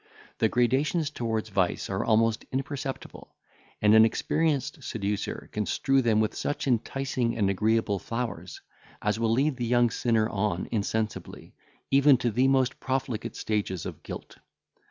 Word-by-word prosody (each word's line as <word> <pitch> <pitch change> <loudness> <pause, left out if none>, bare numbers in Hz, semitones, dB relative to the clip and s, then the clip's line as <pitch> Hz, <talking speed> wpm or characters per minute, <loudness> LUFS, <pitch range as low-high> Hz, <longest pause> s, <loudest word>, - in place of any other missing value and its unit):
The - - +3
gradations 140 +6 +1
towards 110 -5 -2
vice 95 -3 0
are 95 0 -2
almost 115 0 +2
imperceptible, 135 0 -5 0.5
and 105 0 +6
an 110 0 +8
experienced 145 +5 0
seducer 105 -2 -3
can 105 -1 -2
strew 135 0 +2
them 115 -3 +2
with 110 0 +1
such 145 - -3
enticing 125 -1 -1
and 100 -3 +2
agreeable 105 0 +1
flowers, 115 -8 -5 0.4
as 105 +1 0
will 115 -1 +1
lead 135 +3 +1
the 120 - -2
young 120 -1 +3
sinner 115 -3 +1
on 100 -4 -1
insensibly, 110 0 -3 0.4
even 140 0 +6
to 120 -1 -1
the 125 +5 +3
most 135 -1 +2
profligate 130 -4 -3
stages 100 -5 -2
of - - -7
guilt. - - -9
115 Hz, 145 wpm, -27 LUFS, 105-130 Hz, 0.5 s, an